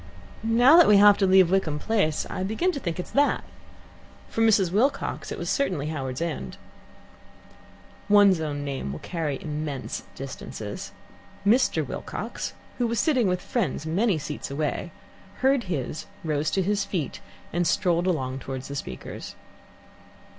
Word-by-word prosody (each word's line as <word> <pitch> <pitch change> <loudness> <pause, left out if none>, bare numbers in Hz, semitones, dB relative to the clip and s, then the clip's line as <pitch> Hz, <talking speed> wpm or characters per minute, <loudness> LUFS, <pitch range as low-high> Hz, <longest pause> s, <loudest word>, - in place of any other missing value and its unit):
"Now 240 +7 +6
that 345 - +8
we 210 - +7
have 205 0 +7
to 195 - +3
leave 185 -2 +6
Wickham 180 -6 +1
Place, 160 -4 0
I - - -5
begin 220 - 0
to 285 - -4
think 175 -7 -4
it's 180 - -5
that. 285 +1 +2 0.9
For 225 - -2
Mrs. 205 -6 +4
Wilcox 265 +8 0
it - - -4
was - - -5
certainly 180 - 0
Howards 135 -2 -3
End." 150 - -4 1.5
One's 200 -4 +6
own 145 -2 -3
name 135 - -3
will 70 - -5
carry 155 -6 -3
immense 150 -3 -4
distances. 110 -5 -7 0.5
Mr. 240 +6 +3
Wilcox, - - -5 0.3
who 240 - +2
was 230 -1 -1
sitting 255 -4 +3
with 180 0 -1
friends 215 - -2
many 190 +4 +1
seats 150 0 -5
away, 150 +4 -2 0.5
heard 265 -3 +3
his, 155 -4 -4 0.2
rose 155 -1 0
to 190 - 0
his 205 +2 +1
feet, 180 -8 -3 0.3
and 175 0 +1
strolled 175 +1 +2
along 135 -7 -1
towards 130 0 -6
the 140 - -5
speakers. 65 - -7
180 Hz, 150 wpm, -26 LUFS, 150-210 Hz, 1.5 s, that